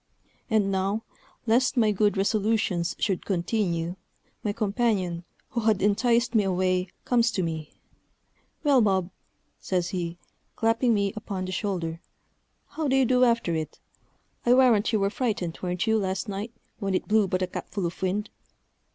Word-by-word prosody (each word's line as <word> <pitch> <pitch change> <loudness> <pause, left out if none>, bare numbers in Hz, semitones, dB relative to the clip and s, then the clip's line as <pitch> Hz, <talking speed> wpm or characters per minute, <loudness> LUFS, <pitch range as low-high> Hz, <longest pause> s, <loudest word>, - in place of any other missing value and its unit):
And 210 -3 +2
now, 195 +3 0 0.4
lest 250 +4 +2
my 220 -3 +4
good 205 0 +2
resolutions 200 -3 +1
should 190 -4 -1
continue, 175 -2 -1 0.5
my 210 - 0
companion, 200 -5 0 0.2
who 240 - -2
had 215 -3 +2
enticed 235 +4 +2
me 220 -3 +4
away, 185 -1 +1 0.2
comes 235 -2 +3
to 190 - 0
me: 160 -2 -5 0.9
"Well, 280 -4 +5
Bob," 190 -4 +1 0.5
says 180 -2 -1
he, 175 -2 -3 0.4
clapping 230 +1 +2
me 200 -1 0
upon 200 -3 -4
the 185 - -5
shoulder, 175 -4 -3 0.7
"how 315 -2 -3
do 265 - +2
you 265 -1 +4
do 250 +1 +3
after 230 -8 +2
it? 160 -1 -4 0.6
I 240 +1 +5
warrant 240 -5 +4
you 215 - +2
were 195 0 +1
frighted, 210 -9 -2
wer'n't 180 +1 -1
you, 220 -1 +3
last 190 -1 -2
night, 205 +3 -4 0.3
when 195 -3 -1
it - - -1
blew 215 -1 +3
but 185 0 0
a - - 0
capful 190 +1 -4
of 170 - -5
wind?" 195 +3 -1
200 Hz, 160 wpm, -26 LUFS, 185-225 Hz, 0.9 s, Well